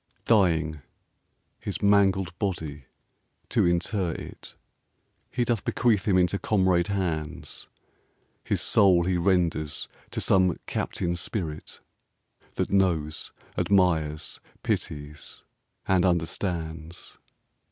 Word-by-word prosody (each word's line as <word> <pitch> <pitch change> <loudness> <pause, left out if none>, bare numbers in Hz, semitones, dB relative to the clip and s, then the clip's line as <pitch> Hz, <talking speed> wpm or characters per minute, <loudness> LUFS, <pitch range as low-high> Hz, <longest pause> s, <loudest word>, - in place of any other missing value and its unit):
Dying, 80 -8 +2 0.8
his - - -5
mangled 95 -3 +3
body, 80 -8 -3 0.6
to - - +3
inter 85 +1 0
it, - - -10 0.7
He 120 -1 0
doth 115 -4 0
bequeath 110 -6 +1
him 95 -3 +3
into 90 +2 +2
comrade 95 -4 +2
hands; 85 -6 -3 0.8
His - - -1
soul 95 -4 +5
he 90 -1 +1
renders 85 -4 +1 0.2
to - - -4
some 90 -3 +3
Captain 85 0 -2
Spirit 85 -4 -4 0.7
That - - -1
knows, 85 -6 +1 0.2
admires, 80 -6 +1 0.2
pities, 75 0 -4 0.4
and 95 -2 +3
understands! 85 -1 -2
90 Hz, 95 wpm, -26 LUFS, 80-95 Hz, 0.8 s, soul